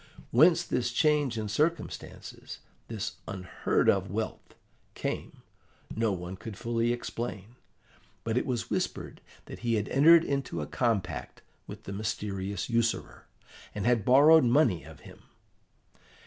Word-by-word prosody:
Whence 160 +8 +5
this 120 -1 -1
change 145 -2 +2
in 110 -1 -3
circumstances, 155 +11 -3 0.3
this 110 -4 -5
unheard 95 -3 -1
of 95 -1 +3
wealth, 110 +3 -5 0.4
came, - - -5 0.5
no 110 -1 +1
one 90 0 -5
could 110 -1 -8
fully 115 0 0
explain; 120 -2 -5 0.7
but 115 -1 -2
it 125 - 0
was 125 -3 -3
whispered - - -3 0.2
that - - -9
he 120 -1 0
had 105 -1 -1
entered 165 +4 +6
into 140 - -2
a 75 - -3
compact 115 - -2 0.2
with - - -9
the 100 - -7
mysterious 100 -2 -3
usurer, 115 -1 -1 0.5
and 105 -1 -3
had 120 -3 +3
borrowed 145 +6 +7
money 120 - +3
of 80 0 -13
him. - - -14
115 Hz, 135 wpm, -29 LUFS, 100-125 Hz, 0.7 s, borrowed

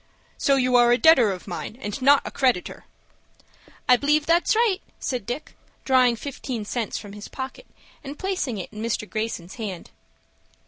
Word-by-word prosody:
So 275 - +2
you 255 -1 +2
are 240 0 +5
a 240 - +5
debtor 260 -8 +6
of 185 0 -7
mine, 200 +5 -6
and 210 +1 -5
not 280 +2 +5
a - - -5
creditor?" 255 -9 0 1.0
"I 250 - +7
b'lieve 295 +3 +2
that's 340 +5 +3
right," 440 -4 +2 0.2
said 245 -6 -3
Dick, 245 +6 -5 0.3
drawing 255 -2 +4
fifteen 245 -3 -5
cents 225 0 -3
from 205 -1 -9
his 210 0 -9
pocket, 265 - -7 0.4
and 285 +1 -7
placing 370 - -2
in 210 +3 -7
Mr. 220 -2 -2
Greyson's 215 -4 -4
hand. 190 -5 -6
250 Hz, 165 wpm, -24 LUFS, 215-280 Hz, 1.0 s, I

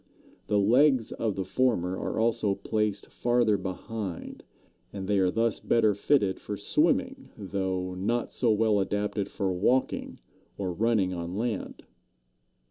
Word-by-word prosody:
The 105 - +2
legs 125 +4 +4
of 110 -4 -2
the 95 - -3
former 100 -9 +1
are - - -3
also 110 -3 +1
placed 105 0 -2
farther 120 -3 +2
behind, 95 0 -5 0.5
and 95 -2 -6
they 100 -1 +2
are 95 -1 +3
thus 115 +3 0
better 110 -3 +3
fitted 100 -2 +1
for 105 - -5
swimming, 260 - 0
though 95 -2 -3
not 110 +6 -1
so 120 - +1
well 105 -1 +3
adapted 100 +1 -1
for 95 -2 -2
walking 125 +9 0 0.4
or 95 -2 -2
running 105 -2 +1
on 85 +1 -5
land. 115 -2 -3
105 Hz, 135 wpm, -28 LUFS, 95-115 Hz, 0.5 s, legs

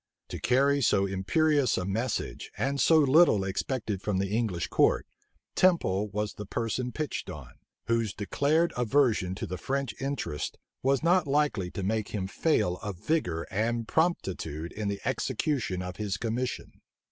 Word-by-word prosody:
To - - -5
carry 140 +3 +3
so 100 -5 +3
imperious 130 +8 +2
a 90 - -1
message, 110 +5 -3
and 140 +1 0
so 160 - +6
little 145 - +5
expected 100 +1 -2
from 100 -2 -1
the 100 +2 -1
English 105 -8 0
court, - - +3 0.5
Temple 105 - +2
was 105 +1 -2
the 105 - -8
person 120 +4 -2
pitched 155 +3 -4
on, 70 -5 -8 0.3
whose 115 -2 +1
declared 150 +10 +1
aversion 120 -7 +2
to - - -4
the 90 +1 -5
French 135 -2 -2
interest 135 - -3 0.2
was 135 +2 +2
not 175 -1 +3
likely 140 -10 +1
to 95 - -5
make 110 +2 0
him 100 -3 -3
fail 100 - +1
of 100 -4 -6
vigor 90 - -1
and 115 +2 -1
promptitude 90 - -1
in 105 -1 -4
the 100 0 -3
execution 115 -12 -1
of 90 0 -6
his 100 -3 -2
commission. 120 +3 -3
110 Hz, 155 wpm, -28 LUFS, 95-140 Hz, 0.5 s, so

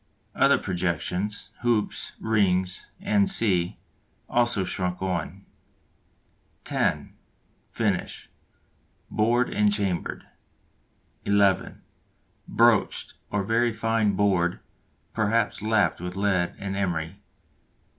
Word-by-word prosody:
Other - - +4
projections, 90 +3 -2
hoops, 120 -3 0
rings, 95 -4 +1 0.4
&c., 100 - +1 0.5
also 120 -5 +2
shrunk 90 -1 -2
on. 95 0 -3 1.2
(10) - - -1 0.6
Finish - - -2 0.8
bored 120 +3 +2
and 105 0 +3
chambered. 100 -4 -2 1.0
(11) 100 -1 +2 0.6
Broached, 115 -2 +2 0.2
or 105 -1 -1
very 115 +4 +2
fine 110 -2 +1
bored, 95 -3 +1 0.5
perhaps 110 0 +1
lapped 105 -6 +1
with 90 0 -5
lead 95 -3 0
and 95 -1 -4
emery. 90 -1 -2
100 Hz, 85 wpm, -26 LUFS, 90-110 Hz, 1.2 s, Other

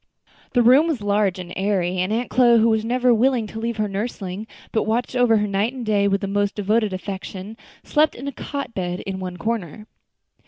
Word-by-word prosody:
The 245 - +4
room 265 +7 +6
was 300 -9 -1
large 205 -2 +1
and 180 -1 -8
airy, 185 -2 0
and 185 +3 0
Aunt 235 +3 -1
Chloe, 240 -2 +5
who 225 +1 +4
was 220 -1 +1
never 250 +1 +2
willing 240 0 +2
to 220 +1 -7
leave 230 0 -3
her 215 -1 0
nursling, 200 -1 -4 0.2
but 220 - 0
watched 240 +3 -1
over 245 -3 +4
her 210 - +1
night 205 +4 0
and 255 -3 -6
day 205 -2 +2
with 195 0 +1
the 195 - -2
most 205 0 0
devoted 210 +1 +1
affection, 190 +2 -6 0.3
slept 305 0 +2
in 265 +4 -7
a - - -2
cot 280 -2 -6
bed 180 -2 -3
in 190 -1 -5
one 180 -1 -5
corner. 215 -2 -3
215 Hz, 210 wpm, -22 LUFS, 195-235 Hz, 0.3 s, room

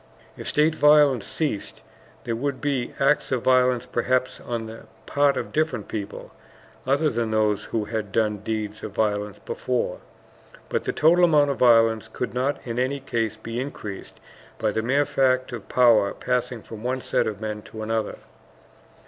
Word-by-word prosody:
If - - -8
state 155 +2 +3
violence 150 -6 +5
ceased, 145 -11 -3 0.4
there 115 - -2
would 135 +3 -2
be 140 -4 -1
acts 140 +1 +2
of 130 -3 0
violence 125 -1 +3
perhaps 125 +1 0
on 115 -2 -4
the 110 +1 -10 0.2
part 140 -1 +2
of - - -4
different 155 -9 0
people, 105 -2 -6 0.6
other 140 +4 +3
than 115 -1 -1
those 105 -1 +1
who 110 -2 -2
had 110 -2 -4
done 105 -1 +1
deeds 110 0 -4
of 105 - -7
violence 105 -1 -1
before. 125 -8 -2 0.7
But - - -1
the - - 0
total 175 +3 +5
amount 150 -4 +4
of 140 - -5
violence 115 -2 +4
could 125 - -4
not 130 +3 0
in 120 0 -3
any 135 +3 0
case 115 -4 -2
be 115 +2 -5
increased 105 -7 -7 0.4
by - - 0
the 110 - -1
mere 135 +5 +2
fact 130 -2 +1
of 120 -4 -8
power 115 -5 +4
passing 125 -2 -2
from 110 -2 -10
one 130 +2 -2
set - - 0
of 105 -2 -4
men 105 -1 -4
to 110 +1 -8
another. 110 0 -2
120 Hz, 170 wpm, -24 LUFS, 110-135 Hz, 0.7 s, violence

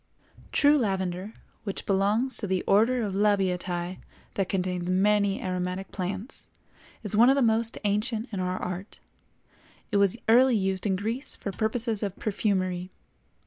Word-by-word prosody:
True 290 +1 +4
lavender, 190 -2 -2 0.3
which 195 -3 -4
belongs 205 +7 +1
to 205 - -2
the 190 -1 0
Order 230 +5 +3
of 200 -3 -2
Labiatæ 185 -3 0 0.3
that 195 -2 -1
contains 180 -2 -1
many 200 +1 +2
aromatic 185 +1 -3
plants, 195 +6 -5 0.6
is 210 -1 -2
one 235 +4 +7
of 270 - +5
the 275 - +2
most 225 0 +1
ancient 215 +3 0
in 200 - -3
our 185 0 -1
art; 180 +3 -6 0.9
it 205 - +2
was 200 +2 +3
early 250 +2 +6
used 190 -1 0
in 190 - +1
Greece 225 +8 -3
for 200 - -5
purposes 220 +1 0
of 200 -3 -3
perfumery. 185 -4 -1
200 Hz, 145 wpm, -27 LUFS, 185-220 Hz, 0.9 s, one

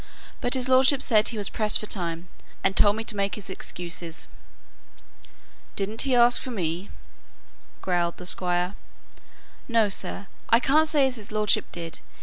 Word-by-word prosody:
But 245 - +2
his 255 -1 -1
lordship 260 +1 +4
said 215 -4 +3
he 230 - -2
was 205 - +4
pressed 215 -1 +3
for - - -6
time, 170 -4 -3 0.4
and 195 0 +2
told 205 0 +5
me 220 - -4
to 225 - -3
make 200 0 -1
his 200 -2 -9
excuses." 170 -2 -5 1.5
"Didn't 210 +3 -3
he 270 -2 +1
ask 240 0 +5
for 260 - -7
me?" 180 -4 -3 0.9
growled 175 -2 -1
the 180 - -10
Squire. 180 0 0 0.9
"No, 230 -4 +2
sir; 195 +1 -2 0.2
I 230 - +5
can't 305 +5 +3
say 290 -3 +3
as 260 -2 -2
his 215 -1 -11
lordship 215 -1 +1
did. 165 -1 -5
210 Hz, 160 wpm, -25 LUFS, 180-245 Hz, 1.5 s, told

